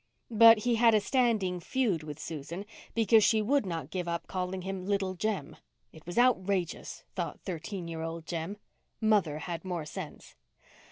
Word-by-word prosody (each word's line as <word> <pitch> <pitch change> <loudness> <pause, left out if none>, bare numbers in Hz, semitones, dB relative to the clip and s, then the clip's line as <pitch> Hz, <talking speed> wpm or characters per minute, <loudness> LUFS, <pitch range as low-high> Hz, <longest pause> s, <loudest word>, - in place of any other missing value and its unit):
But 225 0 +8
he 240 -2 +2
had 230 -1 +6
a - - +5
standing 215 -7 +1
feud 205 -3 0
with 150 -2 -7
Susan 160 +4 -6 0.3
because 225 -1 +5
she 220 +1 +4
would 225 +1 +1
not 165 -5 -4
give 180 -2 -3
up 170 0 -2
calling 185 0 -3
him 190 0 -4
Little 195 -1 0
Jem. 185 -5 -3 0.4
It 160 +1 -15
was 175 - -6
outrageous, 200 -8 +1
thought - - -4
thirteen 180 0 -5
year 165 -1 -5
old 165 0 -5
Jem. 170 +5 -4 0.4
Mother 205 -9 +2
had 165 +1 -5
more 175 -4 -3
sense. - - -8
185 Hz, 165 wpm, -30 LUFS, 170-220 Hz, 0.4 s, But